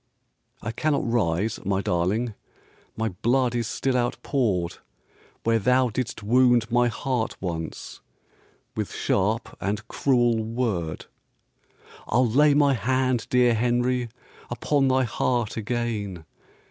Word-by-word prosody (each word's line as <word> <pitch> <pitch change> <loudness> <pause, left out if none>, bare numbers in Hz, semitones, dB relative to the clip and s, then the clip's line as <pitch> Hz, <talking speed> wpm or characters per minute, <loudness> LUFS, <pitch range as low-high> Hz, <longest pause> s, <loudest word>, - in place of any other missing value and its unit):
"I 110 - -2
cannot 150 +1 0
rise, 105 -3 0
my 95 -1 0
darling, 100 +6 0 0.6
My 110 0 0
blood 120 +6 +1
is 120 -2 -1
still 130 +3 -1
outpoured 120 - 0 0.7
Where 115 0 +2
thou 125 +3 +3
didst 115 -1 -4
wound 120 0 +3
my 120 0 +4
heart 120 0 -2
once 85 -3 -5 0.7
With - - -3
sharp 110 +4 -1
and 105 +3 -2
cruel 120 -5 +2
word." 110 -9 -2 1.0
"I'll 125 +4 +3
lay 145 +5 +4
my 145 -1 +4
hand, 130 0 0
dear 125 -1 +4
Henry, 120 +1 +1 0.4
Upon 135 +3 +1
thy 130 0 +3
heart 120 -1 -1
again. 105 -6 -3
120 Hz, 115 wpm, -25 LUFS, 105-125 Hz, 1.0 s, my